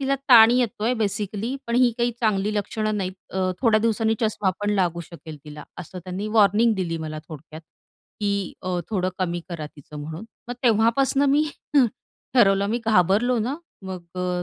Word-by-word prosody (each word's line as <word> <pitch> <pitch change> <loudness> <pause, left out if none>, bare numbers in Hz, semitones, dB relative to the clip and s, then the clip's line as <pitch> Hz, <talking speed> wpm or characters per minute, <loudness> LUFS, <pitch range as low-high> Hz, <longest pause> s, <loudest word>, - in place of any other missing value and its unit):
तिला 275 0 +1
ताण 230 -2 +9
येतोय 240 -1 +1
बेसिकली 215 +2 -2
पण 235 - -2
ही 250 -1 +5
काही 240 0 +2
चांगली 210 -1 +1
लक्षणं 215 +1 -2
नाहीत 185 -2 -2 0.2
अ, 185 0 0
थोड्या 225 -3 +4
दिवसांनी 225 0 +1
चष्मा 210 -3 +1
पण 205 0 0
लागू 175 -3 0
शकेल 160 -2 -11
तिला. 150 -1 -10
असं 180 +1 -8
त्यांनी 190 +3 -4
वॉर्निंग 215 +3 +4
दिली 170 -4 -2
मला 155 -1 -5
थोडक्यात, 155 +1 -10 0.6
की 200 -3 -1
अ, 185 -1 -2
थोडं 185 -3 0
कमी 175 -2 -1
करा 165 -3 -5
तिचं 145 +1 -10
म्हणून. 160 +7 -7 0.2
मग 245 - -3
तेव्हापासून 240 +5 +3
मी 290 +2 +4 0.3
हं. 260 - +6 0.5
ठरवलं 200 -4 +4
मी 235 - 0
घाबरलो 220 +4 +3
ना, 250 +7 -2 0.3
मग 185 -2 -6
अ, 180 -1 -2
205 Hz, 170 wpm, -23 LUFS, 180-230 Hz, 0.6 s, ताण